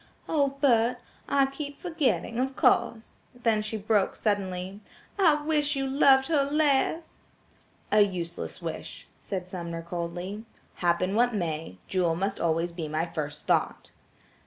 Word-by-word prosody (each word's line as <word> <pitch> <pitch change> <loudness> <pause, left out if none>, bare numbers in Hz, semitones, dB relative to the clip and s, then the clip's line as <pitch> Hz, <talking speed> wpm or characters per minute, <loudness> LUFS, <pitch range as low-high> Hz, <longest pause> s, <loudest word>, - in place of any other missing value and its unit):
"Oh! 280 -3 +1
Bert, 245 -3 +3 0.3
I 275 -1 +4
keep 285 +1 -6
forgetting–of 265 -6 -1
course–," 225 -1 +1 0.2
then 230 -3 +1
she 215 +1 -4
broke 210 -1 +1
suddenly, 190 -2 -2 0.4
"I 305 -6 +4
wish 300 -1 +1
you 270 0 -1
loved 270 0 +5
her 295 -2 +2
less!" 295 +2 0 0.6
"A 210 - +6
useless 175 -4 -2
wish," - - -6
said 185 -3 -5
Sumner 170 -2 -5
coldly. 175 +4 -5 0.3
"Happen 175 +2 +1
what 240 +1 +2
may, 160 - -3
Jewel 175 -3 +1
must 195 +3 -2
always 165 +1 0
be 170 -2 -5
my 155 +2 -1
first 150 -3 -5
thought." - - 0
210 Hz, 135 wpm, -27 LUFS, 175-275 Hz, 0.6 s, A